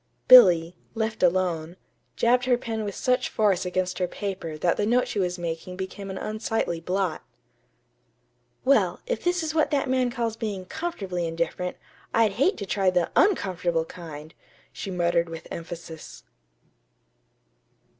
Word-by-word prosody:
Billy, 180 Hz, -9 st, +8 dB, 0.2 s
left 220 Hz, 0 st, -2 dB
alone, 175 Hz, -2 st, +1 dB, 0.4 s
jabbed 245 Hz, +1 st, +3 dB
her 250 Hz, -1 st, +3 dB
pen 225 Hz, -3 st, -4 dB
with 205 Hz, -2 st, -4 dB
such 250 Hz, -1 st, +1 dB
force 200 Hz, -4 st, +1 dB
against 185 Hz, +1 st, -1 dB
her 180 Hz, -, +1 dB
paper 185 Hz, -6 st, -5 dB
that 170 Hz, +2 st, +1 dB
the 205 Hz, -, 0 dB
note 245 Hz, +2 st, +2 dB
she 205 Hz, -, -3 dB
was 180 Hz, -1 st, 0 dB
making 170 Hz, +1 st, -5 dB
became 195 Hz, +1 st, -6 dB
an 190 Hz, -, -5 dB
unsightly 215 Hz, -5 st, -2 dB
blot. 180 Hz, 0 st, -1 dB, 1.4 s
"Well, 275 Hz, +1 st, +3 dB
if -, -, -3 dB
this 355 Hz, -1 st, +1 dB
is 310 Hz, -1 st, -2 dB
what 315 Hz, -1 st, +2 dB
that 285 Hz, -2 st, 0 dB
man 255 Hz, -1 st, +1 dB
calls 235 Hz, -2 st, -2 dB
being 210 Hz, -5 st, -4 dB
'comfortably 190 Hz, -, -3 dB
indifferent,' 170 Hz, +2 st, -3 dB, 0.4 s
I'd 225 Hz, -2 st, +4 dB
hate 275 Hz, -, +1 dB
to 200 Hz, -, -5 dB
try 195 Hz, 0 st, +1 dB
the 180 Hz, -2 st, 0 dB
_un_comfortable 180 Hz, -, +2 dB
kind," 155 Hz, -3 st, -9 dB, 0.4 s
she -, -, -6 dB
muttered 170 Hz, -2 st, +1 dB
with 165 Hz, -1 st, -8 dB
emphasis. 165 Hz, -, -8 dB
190 Hz, 145 wpm, -25 LUFS, 170-230 Hz, 1.4 s, Billy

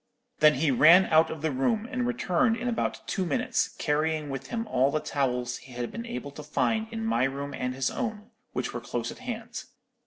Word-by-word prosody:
Then 150 Hz, 0 st, +6 dB
he 145 Hz, +2 st, +2 dB
ran 165 Hz, +9 st, +7 dB
out 160 Hz, 0 st, +5 dB
of 155 Hz, -1 st, -6 dB
the 160 Hz, -, +1 dB
room, 210 Hz, -, 0 dB
and 250 Hz, -1 st, -1 dB
returned 225 Hz, 0 st, +1 dB
in 245 Hz, +1 st, -3 dB
about 235 Hz, -2 st, -2 dB
two 190 Hz, -, -1 dB
minutes, 170 Hz, -5 st, 0 dB
carrying 155 Hz, 0 st, 0 dB
with 135 Hz, -, -5 dB
him 230 Hz, -1 st, -3 dB
all 135 Hz, -, +2 dB
the 155 Hz, -, 0 dB
towels 125 Hz, -4 st, -1 dB
he 130 Hz, 0 st, -14 dB
had 120 Hz, 0 st, -4 dB
been 230 Hz, +1 st, -6 dB
able 230 Hz, -11 st, -5 dB
to 145 Hz, -, -9 dB
find 220 Hz, +9 st, 0 dB
in 225 Hz, -1 st, -4 dB
my 225 Hz, -, +2 dB
room 140 Hz, +1 st, -4 dB
and 125 Hz, 0 st, -3 dB
his 130 Hz, -1 st, 0 dB
own, 225 Hz, -3 st, -4 dB, 0.2 s
which 125 Hz, -, -3 dB
were 120 Hz, -, -4 dB
close 120 Hz, -1 st, -3 dB
at -, -, -11 dB
hand. 235 Hz, -2 st, -6 dB
155 Hz, 215 wpm, -28 LUFS, 135-225 Hz, 0.2 s, ran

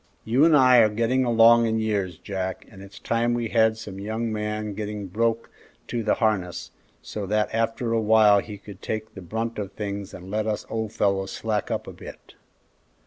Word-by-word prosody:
You 125 Hz, +7 st, +4 dB
and 160 Hz, -2 st, +6 dB
I 130 Hz, -2 st, +6 dB
are 110 Hz, -2 st, +6 dB
getting 115 Hz, +4 st, +1 dB
along 115 Hz, 0 st, +6 dB
in 110 Hz, 0 st, 0 dB
years, 100 Hz, -6 st, -1 dB
Jack, 95 Hz, -1 st, -5 dB
and 95 Hz, -3 st, -13 dB
it's 100 Hz, +2 st, -12 dB
time 120 Hz, +1 st, 0 dB
we 120 Hz, -2 st, -2 dB
had 110 Hz, -1 st, +3 dB
some 100 Hz, -3 st, -8 dB
young 110 Hz, +2 st, -3 dB
man 105 Hz, 0 st, -3 dB
getting 105 Hz, 0 st, -5 dB
broke 115 Hz, +4 st, -1 dB, 0.4 s
to 120 Hz, -, -2 dB
the 110 Hz, -, +1 dB
harness, 100 Hz, -6 st, -1 dB, 0.3 s
so 100 Hz, -, -5 dB
that 105 Hz, +1 st, 0 dB
after 115 Hz, +1 st, -1 dB
a 115 Hz, -, +2 dB
while 105 Hz, -1 st, +5 dB
he 105 Hz, 0 st, -7 dB
could 100 Hz, -1 st, -13 dB
take 110 Hz, 0 st, -4 dB
the 95 Hz, -, -9 dB
brunt 110 Hz, +5 st, -4 dB
of 100 Hz, -1 st, -5 dB
things 100 Hz, -1 st, -5 dB
and 95 Hz, +2 st, -10 dB
let 110 Hz, +1 st, -1 dB
us 105 Hz, -1 st, -2 dB
old 110 Hz, -2 st, -2 dB
fellows 95 Hz, -2 st, 0 dB
slack 110 Hz, -2 st, -2 dB
up -, -, -2 dB
a -, -, -9 dB
bit." -, -, -12 dB
110 Hz, 200 wpm, -24 LUFS, 100-115 Hz, 0.4 s, and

